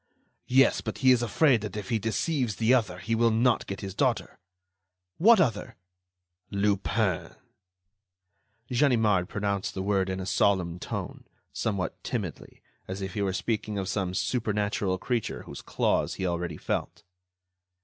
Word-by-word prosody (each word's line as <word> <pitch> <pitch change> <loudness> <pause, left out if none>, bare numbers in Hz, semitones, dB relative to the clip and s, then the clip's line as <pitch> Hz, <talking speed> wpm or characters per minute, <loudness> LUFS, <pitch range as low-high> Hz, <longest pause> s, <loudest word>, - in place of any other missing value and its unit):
"Yes, 135 +2 +4
but - - -5
he 130 - +8
is 125 -2 +4
afraid 120 +1 +3
that 105 -1 -5
if 105 - -6
he 115 -2 +1
deceives 115 - -1
the 115 +4 +3
other, 110 -8 +1
he 110 +6 -3
will 115 +1 +4
not 115 +2 +2
get 100 - -5
his 95 -2 -5
daughter." - - -1 0.8
"What 220 +5 +7
other?" 115 - 0 0.7
"Lupin." 100 -1 0 1.4
Ganimard 110 -8 +3
pronounced 100 -1 -2
the 95 - -2
word 95 -1 +1
in 95 0 -3
a 95 - -4
solemn 95 -5 +1
tone, - - -6 0.3
somewhat 100 -4 -2
timidly, - - -5 0.2
as 95 +1 -5
if 95 -1 -5
he 105 - -2
were 100 -1 +1
speaking 105 +1 -2
of 95 -1 -2
some 95 -2 -2
supernatural 105 -4 0
creature 120 +3 -2
whose - - -9
claws - - 0
he 95 - -3
already 85 -2 -2
felt. - - -3
105 Hz, 150 wpm, -27 LUFS, 95-115 Hz, 1.4 s, he